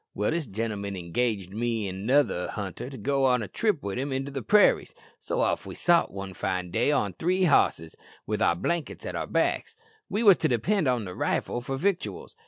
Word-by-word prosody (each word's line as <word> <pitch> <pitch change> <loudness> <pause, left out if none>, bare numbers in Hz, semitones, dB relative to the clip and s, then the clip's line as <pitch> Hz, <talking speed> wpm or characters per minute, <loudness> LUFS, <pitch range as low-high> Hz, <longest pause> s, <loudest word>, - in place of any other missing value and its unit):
"Well, 105 - 0
this 160 -3 -2
gentleman 100 -1 -3
engaged 95 +2 -2
me 115 -1 -1
an' 95 - -4
another 110 -2 +1
hunter 100 +4 -5
to 135 - -9
go 135 +4 +2
a 120 -4 0
trip 210 - 0
with 100 +4 -3
him 140 +2 -2
into 135 +1 -2
the 135 -1 -4
prairies, 210 - +4 0.2
so - - -2
off - - 0
we - - -7
sot 170 -1 +3
one 95 0 -6
fine 90 0 -3
day 120 +8 +2
on 105 -10 0
three 180 - 0
hosses, 80 - +2 0.3
with 105 0 -2
our 85 - +3
blankets 170 - -3
at - - -4
our - - -3
backs - - 0 0.3
we 215 +3 -1
wos 200 -5 +8
to - - +1
depend 160 - +1
on 125 -4 +1
the 90 - -6
rifle 120 - -1
for 135 +2 -4
victuals. 190 - -2
120 Hz, 200 wpm, -27 LUFS, 100-145 Hz, 0.3 s, wos